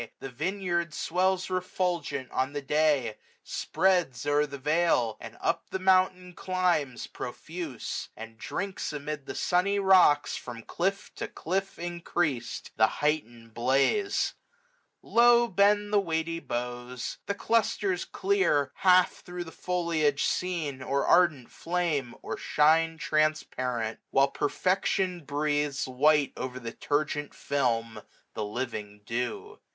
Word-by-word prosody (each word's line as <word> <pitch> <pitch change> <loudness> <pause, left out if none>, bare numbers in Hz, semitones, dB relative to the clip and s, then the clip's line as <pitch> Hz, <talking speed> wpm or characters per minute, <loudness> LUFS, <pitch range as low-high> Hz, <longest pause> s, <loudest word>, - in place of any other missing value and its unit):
The 135 - -6
vineyard 170 +2 -2
swells 185 +2 +1
refulgent 175 -7 -2
on 130 +2 -1
the 145 - -3
day 150 -1 +3
j 110 -2 -6 0.3
Spreads 175 -10 0
o'er 145 +1 +2
the 140 -1 -7
vale 150 -6 +2
j - - -6
or - - -15
up - - -1
the - - -2
mountain 185 -1 +2
climbs, 175 -8 0
685 - - -10
Profuse; 155 0 -5
and 115 +1 -9
drinks 195 -4 -4
amid 150 -1 -5
the - - -5
sunny 190 +3 +1
rocks. 185 -7 +5
From 115 -2 -7
cliff 195 - -2
to - - -3
cliff 190 +4 -3
increas'd, 170 -7 -2
the 110 0 +6
heightened 120 -6 -2
blaze. 135 - +1 0.7
Low 240 0 +5
bend 205 +1 +3
the 205 - +6
weighty 165 -2 -1
boughs. 125 -1 -5
The 200 - -1
clusters 205 -4 +1
clear. 380 - +1
Half 185 -1 +4
thro* 180 -1 -6
the 165 - -10
foliage 165 -6 0
seen, 160 -7 -1
or 140 +2 0
ardent 155 -9 +3
flame. 165 -8 -1
Or - - -4
shine 160 +2 +3
transparent; 130 -8 -1
while 135 +1 +4
perfection 185 +3 0
breathes 145 -1 0
690 130 -1 -5
White 150 -2 +4
o'er 130 0 -4
the 115 -2 -6
turgent 145 +2 -2
film 115 -5 -1 0.3
the 110 - -3
living 105 -2 -5
dew. 115 +1 -4
155 Hz, 130 wpm, -28 LUFS, 130-180 Hz, 0.7 s, the